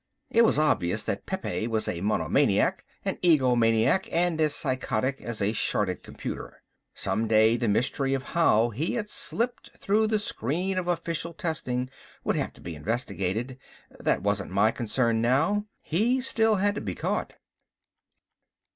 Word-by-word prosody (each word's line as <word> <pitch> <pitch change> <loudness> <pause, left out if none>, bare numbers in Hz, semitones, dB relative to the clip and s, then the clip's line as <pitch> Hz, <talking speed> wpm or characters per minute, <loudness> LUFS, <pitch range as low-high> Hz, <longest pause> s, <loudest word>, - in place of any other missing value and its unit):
It 230 - +5
was 225 - +4
obvious 95 - +1
that - - -4
Pepe 90 +6 -2
was 110 -2 0
a 85 - -3
monomaniac, 105 +2 +2 0.2
an - - -1
egomaniac, 125 -1 +3
and 170 -1 +1
as 150 -2 +2
psychotic 130 -1 -1
as 115 -3 -4
a 100 - +2
shorted - - 0
computer. - - -7 0.3
Some 115 +1 -1
day 110 +1 +5
the 120 0 -1
mystery 135 +5 +1
of 130 - -4
how 120 -9 +4
he 145 - -2
had 210 -3 -3
slipped 235 +2 -2
through 215 +2 +2
the 215 0 +2
screen 185 - -1
of 180 - -5
official 170 -1 -2
testing 130 -9 -2 0.4
would - - 0
have - - -1
to - - -18
be 85 - -6
investigated. 110 - -3 0.4
That - - 0
wasn't 100 -1 0
my 100 +4 +3
concern 115 0 0
now. 160 - +2 0.2
He 225 +11 +1
still 225 -4 +2
had 205 +1 +1
to - - -5
be - - -4
caught. - - -2
130 Hz, 155 wpm, -27 LUFS, 110-180 Hz, 0.4 s, It